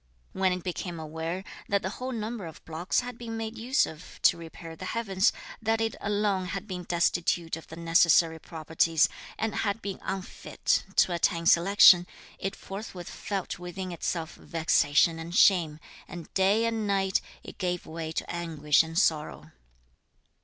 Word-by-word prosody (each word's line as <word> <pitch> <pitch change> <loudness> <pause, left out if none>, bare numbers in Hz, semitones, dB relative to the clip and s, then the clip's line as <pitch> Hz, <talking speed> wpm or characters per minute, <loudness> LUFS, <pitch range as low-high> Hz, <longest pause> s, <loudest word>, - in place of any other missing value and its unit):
When 190 -1 +2
it 180 -1 -3
became 175 -1 -4
aware 160 +4 -4 0.3
that 200 0 +1
the 190 - -2
whole 255 +4 -5
number 220 -4 -4
of 160 - -12
blocks 165 +7 -1
had 245 -1 -8
been 225 -1 -5
made 225 0 -4
use 250 +5 +2
of 160 +2 -11
to - - +6
repair 165 0 -10
the 185 - -8
heavens, 195 -4 +2 0.3
that 225 0 +1
it 225 -1 -1
alone 205 -2 0
had 185 +3 -4
been 180 -3 -5
destitute 170 -1 +1
of 165 - -11
the 160 - -9
necessary 165 0 +4
properties 160 0 +1 0.3
and 225 -1 -1
had 205 0 0
been 200 -3 -5
unfit 190 -1 -2
to 180 - +4
attain 170 0 +1
selection, 175 0 +7 0.3
it 195 - -3
forthwith 195 -3 -8
felt 195 -3 -4
within 180 +1 -6
itself 170 -1 -3
vexation 165 0 +2
and 170 +2 -6
shame, 170 -8 +4 0.3
and 175 -2 -9
day 200 +4 +3
and 225 -2 -1
night, 195 -1 +1 0.2
it - - -11
gave 180 -2 -2
way 160 0 -5
to - - -3
anguish 160 -4 +2
and 165 0 -5
sorrow. 150 - 0
180 Hz, 160 wpm, -28 LUFS, 165-200 Hz, 0.3 s, selection